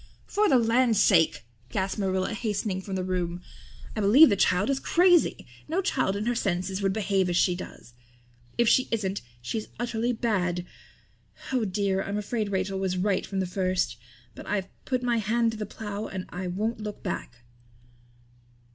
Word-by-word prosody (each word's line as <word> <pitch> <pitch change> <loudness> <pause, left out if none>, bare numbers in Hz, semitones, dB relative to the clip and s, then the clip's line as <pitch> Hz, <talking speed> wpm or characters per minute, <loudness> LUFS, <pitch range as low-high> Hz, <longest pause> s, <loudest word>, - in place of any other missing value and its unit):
"For 420 0 +2
the 260 - +6
land's 235 -1 +3
sake!" 165 - +4 0.2
gasped 190 +4 -2
Marilla, 190 +1 0
hastening 210 -3 -2
from 190 0 -5
the 185 - -1
room. 180 -1 -2 0.5
"I 215 - -1
believe 255 +11 +8
the 200 - +3
child 200 +5 +2
is 270 - 0
crazy. 355 +2 +3 0.2
No 325 +5 0
child 255 - +1
in 205 +1 -2
her 240 - +1
senses 190 -3 -1
would 195 -1 +2
behave 195 -2 +1
as 175 - +1
she 180 - +3
does. 175 -8 -9 0.6
If 235 - +3
she 255 - +4
isn't 200 -4 -1 0.2
she's 215 - -3
utterly 240 0 -1
bad. 185 -7 -1 0.9
Oh 245 -4 +2
dear, 195 0 0
I'm 200 +1 -3
afraid 210 0 -2
Rachel 190 0 -1
was 185 -1 -1
right 190 +1 0
from 195 -1 -2
the - - 0
first. 185 -8 -1 0.4
But - - -11
I've 195 -2 -1 0.2
put 255 -2 -1
my 240 -1 +2
hand 225 +2 +1
to 220 - -7
the 210 - -3
plow 210 0 -5
and 190 -1 -5
I 180 +1 -5
won't 215 +6 -2
look 210 -1 -6
back." 170 -9 -4
200 Hz, 175 wpm, -27 LUFS, 185-230 Hz, 0.9 s, believe